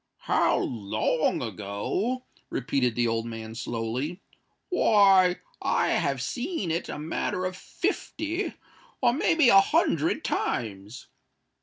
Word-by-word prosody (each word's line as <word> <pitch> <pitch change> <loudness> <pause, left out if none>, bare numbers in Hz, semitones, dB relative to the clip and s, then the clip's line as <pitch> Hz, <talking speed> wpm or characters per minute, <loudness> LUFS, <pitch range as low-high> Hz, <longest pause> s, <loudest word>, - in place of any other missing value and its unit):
"How - - +2
long 110 +9 0
ago?" 110 - -3 0.2
repeated 125 -3 0
the 120 -1 +2
old 115 0 -1
man, 110 -1 -7
slowly: 120 - -3 0.5
"why, 195 - +5 0.2
I - - +1
have 135 -2 0
seen 240 - -3
it 165 - -2
a - - -4
matter 165 +4 -2
of 185 0 -3
fifty—or, 335 - -3
may 330 +5 +2
be 310 -7 +5
a 195 -2 +8
hundred 325 - +1
times. 105 +2 -3
160 Hz, 115 wpm, -27 LUFS, -, 0.5 s, a